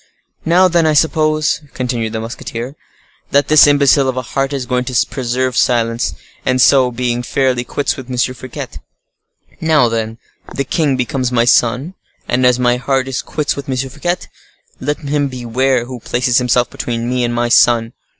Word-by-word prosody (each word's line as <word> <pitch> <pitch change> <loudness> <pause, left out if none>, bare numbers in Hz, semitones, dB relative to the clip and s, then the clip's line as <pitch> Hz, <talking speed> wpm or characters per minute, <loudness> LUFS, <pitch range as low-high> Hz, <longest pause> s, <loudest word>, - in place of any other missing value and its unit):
"Now, 180 +3 +5
then, 170 -2 +2
I 155 - +2
hope," 155 0 +2 0.3
continued 120 -3 -2
the 110 - -2
musketeer, 115 +3 -6 0.5
"that 140 +1 +2
this 155 -1 +7
imbecile 140 -1 +4
of 130 - -3
a 130 - -2
heart 135 +2 -2
is 135 -3 -3
going 125 0 -1
to 125 -2 +1
preserve 130 0 -2
silence, 115 - +1 0.3
and 130 0 +1
so 130 -1 +5
be 120 0 -2
fairly 125 +1 0
quits 140 +3 -2
with 130 -1 -9
M. 125 - -4
Fouquet. 130 0 -4 0.8
Now, 155 -6 +3
then, 110 0 -3 0.4
the 140 - 0
king 140 0 0
becomes 125 0 -1
my 120 -1 +2
sun, 125 +7 +2 0.3
and 125 +1 +2
as 125 -1 +3
my 125 -1 +2
heart 130 +1 -1
is 135 -1 -2
quits 150 -2 -2
with 140 -1 -7
M. 130 - -1
Fouquet, 150 +7 -2 0.6
let 145 +3 -2
him 145 -1 -1
beware 125 0 -1
who 125 0 -8
places 120 +1 +1
himself 125 0 +1
between 115 -1 -4
me 125 0 0
and 120 0 -1
my 120 0 0
sun! 115 -1 +4
125 Hz, 175 wpm, -16 LUFS, 120-140 Hz, 0.8 s, this